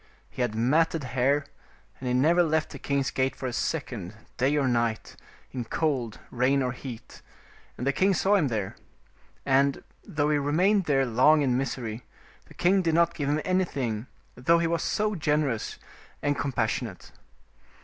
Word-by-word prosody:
He -, -, -5 dB
had 120 Hz, -3 st, 0 dB
matted 155 Hz, +7 st, +2 dB
hair, 130 Hz, +3 st, +1 dB, 0.5 s
and 130 Hz, -, -5 dB
he 125 Hz, -, 0 dB
never 165 Hz, +7 st, +4 dB
left 160 Hz, -2 st, +1 dB
the -, -, -8 dB
king's 140 Hz, -1 st, -1 dB
gate 130 Hz, 0 st, 0 dB
for -, -, -7 dB
a 125 Hz, -, -2 dB
second, 120 Hz, -, -3 dB, 0.2 s
day 135 Hz, +4 st, +2 dB
or 140 Hz, -2 st, +2 dB
night, 115 Hz, -2 st, -1 dB, 0.4 s
in 125 Hz, -2 st, -4 dB
cold, 125 Hz, -3 st, -1 dB
rain, 130 Hz, +2 st, +2 dB
or 125 Hz, -, -1 dB
heat, 120 Hz, -2 st, -9 dB, 0.6 s
and 125 Hz, -, -4 dB
the 140 Hz, -, +2 dB
king 190 Hz, +5 st, +3 dB
saw 195 Hz, +4 st, +2 dB
him 185 Hz, -8 st, +3 dB
there. 110 Hz, -6 st, -3 dB, 0.7 s
And, 135 Hz, +1 st, +2 dB, 0.2 s
though 150 Hz, 0 st, 0 dB
he 150 Hz, -, +2 dB
remained 180 Hz, +8 st, +2 dB
there 135 Hz, -3 st, +2 dB
long 130 Hz, +6 st, +4 dB
in 125 Hz, -3 st, +2 dB
misery, 120 Hz, -3 st, -3 dB, 0.4 s
the -, -, -16 dB
king 190 Hz, +2 st, +3 dB
did 165 Hz, -3 st, +1 dB
not 170 Hz, 0 st, +3 dB
give 145 Hz, -3 st, -2 dB
him 150 Hz, +1 st, +1 dB
anything, 135 Hz, -, -1 dB, 0.3 s
though 150 Hz, +8 st, +3 dB
he 170 Hz, -, +1 dB
was 165 Hz, -1 st, 0 dB, 0.4 s
generous 150 Hz, -6 st, 0 dB, 0.5 s
and 145 Hz, 0 st, +1 dB
compas 125 Hz, -6 st, 0 dB
sionate. -, -, -6 dB
140 Hz, 170 wpm, -27 LUFS, 125-155 Hz, 0.7 s, never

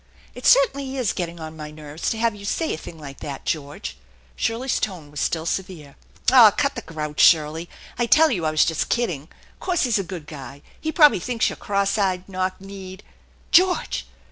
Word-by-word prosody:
" -, -, -27 dB
It -, -, -3 dB
certainly 280 Hz, -, +3 dB
is 245 Hz, -6 st, 0 dB
getting 170 Hz, -1 st, -4 dB
on 160 Hz, 0 st, -7 dB
my 150 Hz, -1 st, -7 dB
nerves 150 Hz, +1 st, -5 dB
to 225 Hz, -, -2 dB
have 230 Hz, 0 st, +1 dB
you 205 Hz, -1 st, -11 dB
say 315 Hz, +10 st, -1 dB
a -, -, -3 dB
thing 165 Hz, -, -10 dB
like 140 Hz, -3 st, -10 dB
that, 140 Hz, -2 st, -7 dB
George/' 145 Hz, -, -3 dB, 0.4 s
Shirley's 235 Hz, -, -1 dB
tone 175 Hz, -8 st, -4 dB
was 150 Hz, -, -6 dB
still 160 Hz, -1 st, -1 dB
severe. 170 Hz, -5 st, -4 dB, 0.4 s
"Aw, 245 Hz, -5 st, +9 dB
cut 280 Hz, +7 st, 0 dB
the 235 Hz, -, -5 dB
grouch, 150 Hz, -5 st, -6 dB
Shirley. 160 Hz, +1 st, +4 dB, 0.3 s
I 240 Hz, -, +2 dB
tell 315 Hz, +5 st, +6 dB
you 180 Hz, -8 st, -1 dB
I 155 Hz, -, +2 dB
was 155 Hz, 0 st, +3 dB
just 160 Hz, -, -1 dB
kidding. 175 Hz, -, -1 dB, 0.3 s
'Course 360 Hz, -2 st, 0 dB
he's 240 Hz, -5 st, +2 dB
a -, -, -1 dB
good 175 Hz, -3 st, -7 dB
guy. 145 Hz, -1 st, -10 dB, 0.2 s
He 315 Hz, -, -2 dB
probably 300 Hz, -, +6 dB
thinks 235 Hz, +5 st, 0 dB
you're -, -, -6 dB
oross 200 Hz, +1 st, 0 dB
eyed, 185 Hz, -2 st, 0 dB
knock 185 Hz, -1 st, -2 dB
kneed 190 Hz, -1 st, -10 dB, 0.2 s
" -, -, -33 dB
" -, -, -32 dB
George 365 Hz, +1 st, +3 dB
185 Hz, 210 wpm, -23 LUFS, 155-235 Hz, 0.4 s, Aw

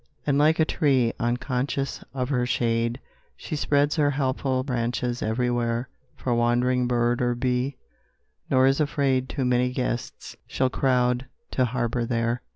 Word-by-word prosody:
And 140 Hz, -1 st, +2 dB
like 155 Hz, +2 st, +4 dB
a 160 Hz, -, +5 dB
tree, 130 Hz, -7 st, +2 dB
unconscious 125 Hz, +3 st, -2 dB
of 130 Hz, -1 st, -3 dB
her 125 Hz, -3 st, +1 dB
shade, 115 Hz, 0 st, 0 dB, 0.4 s
She -, -, -5 dB
spreads 145 Hz, 0 st, +1 dB
her 145 Hz, -2 st, +3 dB
helpful 135 Hz, -1 st, 0 dB
branches 120 Hz, -1 st, -2 dB
everywhere 120 Hz, +1 st, -1 dB, 0.3 s
For 125 Hz, -, -2 dB
wandering 120 Hz, +1 st, +2 dB
bird 120 Hz, 0 st, +1 dB
or 120 Hz, 0 st, +1 dB
bee, 125 Hz, +2 st, -1 dB, 0.7 s
nor 130 Hz, -1 st, +4 dB
is 135 Hz, +2 st, +3 dB
afraid 135 Hz, -3 st, +1 dB
Too 135 Hz, -, -2 dB
many 125 Hz, 0 st, +2 dB
guests 125 Hz, -2 st, -4 dB
shall 130 Hz, -1 st, 0 dB
crowd 125 Hz, -1 st, +1 dB, 0.2 s
to 130 Hz, -, +2 dB
harbor 120 Hz, 0 st, -1 dB
there. 115 Hz, 0 st, 0 dB
125 Hz, 145 wpm, -25 LUFS, 120-135 Hz, 0.7 s, a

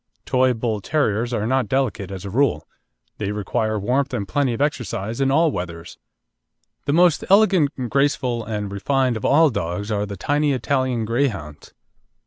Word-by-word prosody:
Toy 130 Hz, -1 st, +2 dB
Bull 110 Hz, -2 st, -2 dB
terriers 120 Hz, -4 st, 0 dB
are 110 Hz, -3 st, -1 dB
not 130 Hz, 0 st, +1 dB
delicate 115 Hz, -6 st, -1 dB
as 95 Hz, -1 st, -7 dB
a 100 Hz, -, -5 dB
rule. 135 Hz, +3 st, +1 dB, 0.5 s
They 100 Hz, -1 st, -2 dB
require 110 Hz, +1 st, -1 dB
warmth 130 Hz, +7 st, 0 dB
and 100 Hz, -, -3 dB
plenty 140 Hz, +1 st, 0 dB
of -, -, -8 dB
exercise 115 Hz, -5 st, -2 dB
in 135 Hz, -, +2 dB
all 160 Hz, +3 st, +3 dB
weathers. 85 Hz, -4 st, -6 dB, 0.9 s
The 140 Hz, -, +2 dB
most 175 Hz, -1 st, +4 dB
elegant, 190 Hz, -7 st, +5 dB, 0.2 s
graceful, 130 Hz, -4 st, +1 dB
and 105 Hz, -2 st, -4 dB
refined 130 Hz, +5 st, 0 dB
of 110 Hz, -, -4 dB
all 155 Hz, +1 st, +5 dB
dogs 95 Hz, +2 st, -3 dB
are 105 Hz, 0 st, -1 dB
the 100 Hz, -1 st, -7 dB
tiny 145 Hz, +7 st, +1 dB
Italian 130 Hz, -2 st, 0 dB
Greyhounds. 105 Hz, -, -2 dB
120 Hz, 160 wpm, -22 LUFS, 105-140 Hz, 0.9 s, elegant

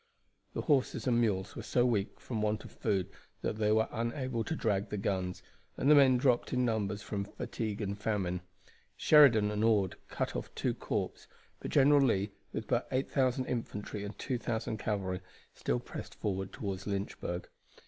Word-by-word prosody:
The -, -, 0 dB
horses 135 Hz, -5 st, +1 dB
and 120 Hz, -2 st, +3 dB
mules 95 Hz, -4 st, 0 dB
were -, -, -5 dB
so 120 Hz, -, +2 dB
weak 110 Hz, -5 st, 0 dB
from 115 Hz, -4 st, -3 dB
want 105 Hz, 0 st, 0 dB
of -, -, -10 dB
food 100 Hz, -5 st, -1 dB, 0.3 s
that -, -, -1 dB
they 105 Hz, -1 st, +2 dB
were 110 Hz, +1 st, +3 dB
unable 115 Hz, 0 st, -2 dB
to 160 Hz, -, -2 dB
drag 100 Hz, -7 st, 0 dB
the 105 Hz, -, -3 dB
guns, 95 Hz, -2 st, -2 dB, 0.3 s
and 140 Hz, -, +3 dB
the -, -, +10 dB
men 135 Hz, -3 st, +7 dB
dropped 125 Hz, -2 st, +2 dB
in 125 Hz, -1 st, +2 dB
numbers 105 Hz, -3 st, -1 dB
from 100 Hz, -2 st, -2 dB
fatigue 105 Hz, +1 st, -4 dB
and 100 Hz, -1 st, -2 dB
famine. 100 Hz, -4 st, -1 dB, 0.6 s
Sheridan 120 Hz, -9 st, +6 dB
and 105 Hz, +1 st, -1 dB
Ord 105 Hz, -5 st, +3 dB
cut -, -, -3 dB
off -, -, -3 dB
two -, -, 0 dB
corps, -, -, -3 dB, 0.3 s
but -, -, -5 dB
General 145 Hz, 0 st, +6 dB
Lee, 105 Hz, -6 st, +2 dB, 0.2 s
with 110 Hz, -, -4 dB
but 120 Hz, -, +1 dB
8,000 130 Hz, -1 st, +1 dB
infantry 105 Hz, -4 st, -4 dB
and 105 Hz, 0 st, -6 dB
2,000 120 Hz, -3 st, -2 dB
cavalry, 95 Hz, -4 st, -2 dB, 0.3 s
still -, -, -1 dB
pressed -, -, -8 dB
forward 95 Hz, -2 st, -2 dB
toward 95 Hz, -2 st, -4 dB
Lynchburg. 100 Hz, -3 st, -3 dB
110 Hz, 170 wpm, -32 LUFS, 100-125 Hz, 0.6 s, the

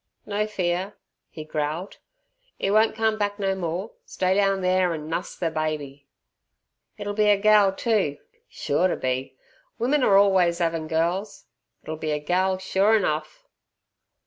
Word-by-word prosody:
"No 210 Hz, +1 st, -1 dB
fear," 185 Hz, -1 st, -2 dB, 0.3 s
he 155 Hz, -, -8 dB
growled, 155 Hz, +4 st, -4 dB, 0.6 s
"'e 195 Hz, -, 0 dB
won't 220 Hz, +1 st, +3 dB
come 220 Hz, -1 st, 0 dB
back 205 Hz, 0 st, -1 dB
no 195 Hz, -2 st, 0 dB
more; 185 Hz, +2 st, -4 dB
stay 185 Hz, 0 st, -1 dB
down 195 Hz, -1 st, +2 dB
there 185 Hz, -1 st, +2 dB
an' 155 Hz, -1 st, -7 dB
nuss 165 Hz, +2 st, -4 dB
ther 165 Hz, -2 st, -2 dB
babby. 150 Hz, -3 st, -4 dB, 0.9 s
It'll 205 Hz, 0 st, -4 dB
be 210 Hz, 0 st, +2 dB
a 205 Hz, -, +5 dB
gal 210 Hz, -1 st, +5 dB
too, 195 Hz, -, 0 dB, 0.3 s
sure 150 Hz, +5 st, 0 dB
to -, -, -1 dB
be! 130 Hz, +1 st, -3 dB, 0.4 s
Women 265 Hz, +5 st, +1 dB
are 195 Hz, -4 st, +5 dB
orlways 185 Hz, -4 st, +3 dB
'avin' 165 Hz, -2 st, -1 dB
gals. 175 Hz, +6 st, -2 dB, 0.4 s
It'll 155 Hz, 0 st, -6 dB
be 155 Hz, -1 st, -2 dB
a -, -, 0 dB
gal 185 Hz, +5 st, 0 dB
sure 195 Hz, +3 st, +2 dB
enough." 155 Hz, -6 st, -3 dB
185 Hz, 150 wpm, -24 LUFS, 160-205 Hz, 0.9 s, a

